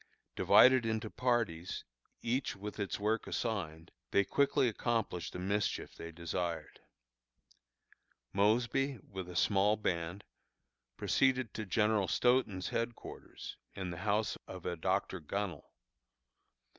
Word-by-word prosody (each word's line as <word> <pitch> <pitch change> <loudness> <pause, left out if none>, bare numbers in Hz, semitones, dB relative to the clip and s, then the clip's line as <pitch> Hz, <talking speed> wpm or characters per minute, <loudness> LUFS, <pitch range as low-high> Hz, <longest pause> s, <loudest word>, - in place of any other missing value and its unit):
Divided 130 -1 +7
into 110 -1 -2
parties, 115 -9 0 0.4
each 125 +1 0
with 105 +2 -7
its 100 0 -2
work 110 +2 0
assigned, 85 -9 -3 0.2
they 100 - +4
quickly 140 +2 +3
accomplished 115 -5 -1
the - - -4
mischief 100 +1 -1
they 85 - -8
desired. 85 -1 -4 1.5
Mosby, 120 +7 +2
with 95 -2 -6
a 90 - -8
small 105 +4 +3
band, 90 -1 -2 0.7
proceeded 130 -4 +2
to 110 -2 -5
General 105 0 +2
Stoughton's 115 -3 +2
headquarters, 115 0 -5 0.2
in 95 -2 -4
the 85 - -6
house 105 +3 0
of 95 -2 -8
a 90 - -1
Dr. 95 +2 0
Gunnel. 90 0 -4
100 Hz, 115 wpm, -34 LUFS, 90-115 Hz, 1.5 s, Divided